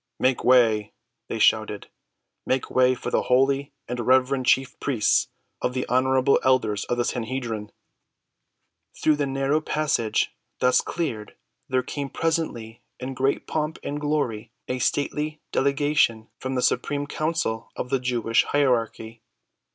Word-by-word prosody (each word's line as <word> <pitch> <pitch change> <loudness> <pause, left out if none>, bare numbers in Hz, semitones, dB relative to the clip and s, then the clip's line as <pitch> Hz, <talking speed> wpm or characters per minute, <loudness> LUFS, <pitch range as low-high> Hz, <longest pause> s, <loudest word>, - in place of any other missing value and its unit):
"Make 130 0 +1
way!" 115 -4 +4 0.3
they - - -3
shouted. - - +2 0.6
"Make 130 0 -1
way 130 0 +4
for 125 - -5
the - - +2
holy 135 +2 +2 0.2
and 125 0 -4
reverend 130 +1 +2
chief 130 -1 +2
priests 125 -7 +2 0.3
and 125 - -1
the 130 - -1
honorable 130 +1 +3
elders 125 -6 +2
of 120 - -2
the 120 - +1
Sanhedrim!" 115 -3 -3 1.3
Through 155 -1 +2
the 145 -1 0
narrow 135 +3 0
passage 145 -9 0 0.2
thus 125 0 +3
cleared 120 -12 -4 0.3
there 130 -1 +1
came 140 +2 -4
presently 150 -10 -2 0.2
in 130 +1 -5
great 135 +2 0
pomp 155 0 -2
and 145 +1 -4
glory 125 -7 -1 0.2
a 125 - -2
stately 150 +4 -1
delegation 140 -5 +1
from 130 0 -3
the 125 - 0
supreme 145 -1 0
council 155 -7 -2
of 125 - -5
the 135 - +2
Jewish 120 -2 +1
hierarchy. 115 -5 0
130 Hz, 135 wpm, -24 LUFS, 120-140 Hz, 1.3 s, way